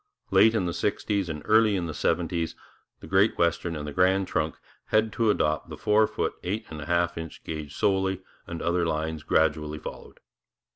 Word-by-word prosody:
Late 110 +1 +6
in 100 -5 +1
the 85 - -2
sixties 100 -1 -1
and 75 -2 -5
early 110 -1 +4
in 90 -3 -1
the 80 - -4
seventies 85 +2 -1 0.5
the - - -9
Great 95 +3 +3
Western 85 0 +1
and 75 -1 -5
the - - -4
Grand 95 +2 +3
Trunk 75 +1 -1 0.3
had 110 0 +1
to 115 -2 +2
adopt 75 -7 +1
the - - -7
four 110 0 +3
foot - - -2
eight 105 +5 -3
and 75 -1 -6
a - - -7
half 85 -1 +1
inch 80 -1 -8
gauge 75 -3 -6
solely, 95 -1 +1 0.2
and 85 -1 -5
other 85 +1 +1
lines 80 -1 -2
gradually 75 -1 +1
followed. - - -9
85 Hz, 190 wpm, -27 LUFS, 80-100 Hz, 0.5 s, Late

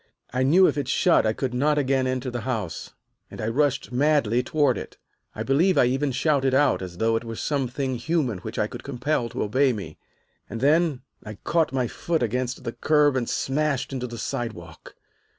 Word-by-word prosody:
I 130 - 0
knew 165 +9 +5
if 150 - +1
it 140 - -3
shut 165 0 +3
I 110 - +1
could 130 +2 -3
not 150 +4 +2
again 135 -2 +1
enter 130 0 -2
the 120 -1 -4
house, 110 -8 -4 0.4
and - - -11
I 110 - -2
rushed 140 +3 0
madly 125 -3 +2
toward 140 0 +1
it. - - -8 0.4
I - - -3
believe 165 +8 +2
I - - +6
even 135 +3 0
shouted 135 0 +1
out, 145 -5 +3
as 90 -2 -7
though 115 +2 +1
it 115 - -1
were 115 -1 -6
something 130 -1 -2
human 130 - -1
which - - -7
I - - +2
could - - -8
compel 125 -1 -1
to - - -3
obey 130 +5 +2
me, 95 -8 -8 0.5
and 115 - -5
then 150 0 +2 0.2
I 105 0 -8
caught 165 -2 +1
my 130 -2 0
foot 165 +5 -2
against 125 +2 -2
the 115 - -3
curb 150 -2 +3
and 125 -3 -1
smashed 140 -1 -1
into 125 -1 -3
the 120 -1 -8
sidewalk. 110 - -6
130 Hz, 200 wpm, -24 LUFS, 120-145 Hz, 0.5 s, I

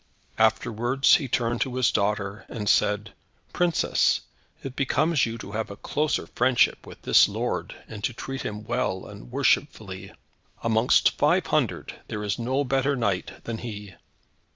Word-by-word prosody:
Afterwards 115 +4 +3
he 140 - -4
turned 120 -1 0
to 130 -1 -1
his 130 -2 +3
daughter, 100 0 -1
and 105 -3 -5
said, 105 +1 +2 0.4
"Princess, 175 -2 +2 0.4
it 135 -1 -6
becomes 145 0 +2
you 115 0 -5
to 100 - -9
have 110 +1 -3
a 100 - -7
closer 150 +8 -1
friendship 125 0 +2
with - - -12
this - - +6
lord, - - -3
and 105 -1 -9
to - - -1
treat 135 +3 -6
him 105 0 -5
well 115 -5 -2
and 105 +3 -11
worshipfully. 110 -8 0 0.5
Amongst 115 +1 +4
five - - +3
hundred, - - -1
there 105 0 -4
is 105 +2 -2
no 130 +4 0
better 135 +1 +1
knight 100 -7 -2
than 115 -1 -5
he." 105 -4 -7
115 Hz, 155 wpm, -25 LUFS, 105-130 Hz, 0.5 s, this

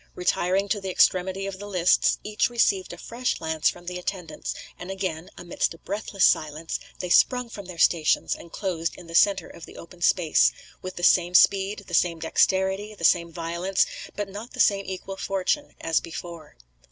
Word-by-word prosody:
Retiring 180 +2 +1
to 205 0 0
the 190 - -4
extremity 185 +1 +2
of 195 -1 -6
the 205 - -7
lists, 180 -3 +3
each 210 +2 0
received 200 -5 +1
a - - -9
fresh 245 +2 -3
lance 160 -2 +1
from 175 0 -9
the 180 0 -5
attendants; 180 -3 -5 0.2
and 180 - -8
again, 185 -4 -4
amidst 175 -1 -2
a - - -15
breathless 200 0 -1
silence, 155 +1 0 0.2
they 180 - -5
sprung 250 +3 +4
from 200 -4 -8
their 180 -2 -9
stations, 165 -1 +3
and 170 - -10
closed 170 -4 -3
in 180 - -12
the 165 - -11
centre 190 0 +4
of 165 - -11
the - - -13
open 175 +1 -13
space, 170 -2 +4 0.3
with 185 0 -7
the 175 - -7
same 175 0 +4
speed, 200 +2 +4
the 175 - -12
same 170 0 +2
dexterity, 190 +5 +1
the 170 - -11
same 170 0 +3
violence, 170 +3 0 0.3
but 205 -1 -3
not 205 +5 -9
the - - -10
same 200 -1 +3
equal 190 +1 -6
fortune, 195 +12 -2
as 165 -1 +1
before. 170 - -9
185 Hz, 190 wpm, -25 LUFS, 170-195 Hz, 0.3 s, sprung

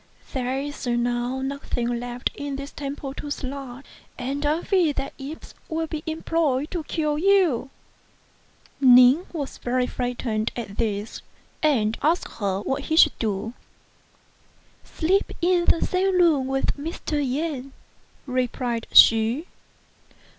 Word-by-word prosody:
There 260 0 -1
is 285 -1 -5
now 240 +2 0
nothing 245 -3 -2
left 245 0 -3
in 285 -1 -5
this 275 +1 -7
temple 280 -1 -6
to 290 - -7
slay, 270 -2 -6 0.3
and 275 +3 -3
I 300 +3 +1
fear 355 -7 +2
that 275 0 -4
imps 285 +4 -8 0.2
will 325 0 -1
be 310 -1 -5
employed 315 -3 0
to 345 -3 -3
kill 300 -2 -1
you. 360 -9 +3 1.1
Ning 255 +5 +7
was 290 -5 -5
very 250 +1 0
frightened 245 -3 -2
at 210 -4 -6
this, 210 -2 -2 0.4
and 230 -9 +2
asked 330 +4 +1
her 195 -2 -1
what 270 +5 -2
he 315 - 0
should 315 -2 +5
do. 215 0 -2 0.6
" - - -35
Sleep 375 +5 +1
in 350 0 +2
the 330 - +3
same 370 0 +1
room 305 -7 +4
with 270 0 0
Mr. 300 0 -3
Yen," 275 0 -3 0.5
replied 250 -2 -2
she. 225 +7 +6
275 Hz, 130 wpm, -24 LUFS, 245-310 Hz, 1.1 s, Ning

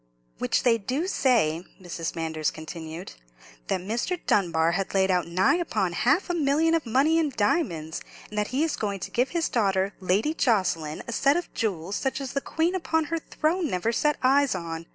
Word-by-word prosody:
"Which - - +1
they 230 -2 +4
do 260 - -2
say," 215 - +2 0.2
Mrs. 170 -3 -5
Manders 160 -2 -1
continued, 160 +2 -8 0.6
"that 185 - -1
Mr. 235 - -2
Dunbar 165 -4 +2
had 195 +3 -2
laid 190 0 +3
out 180 -3 +1
nigh 185 - +3
upon 215 - -1
half 275 - +2
a 350 - -1
million 320 +1 +2
of 325 -6 0
money 285 +8 +3
in 315 -2 +1
diamonds; 180 - 0 0.3
and 210 - -10
that 210 - 0
he 270 +5 0
is 320 - 0
going 200 -2 -3
to - - -5
give 250 +3 +1
his 340 -1 0
daughter, 195 -3 +1
Lady 195 - +1
Jocelyn, 175 - 0
a - - -4
set 275 +7 +3
of 350 - -5
jewels 195 -4 -2
such 265 0 -1
as 270 -3 -5
the 275 - 0
Queen 330 +5 0
upon 320 -3 0
her 330 - +1
throne 320 +2 -1
never 185 0 0
set 295 +5 +1
eyes 275 -2 +4
on. 165 -1 -5
220 Hz, 195 wpm, -26 LUFS, -, 0.6 s, they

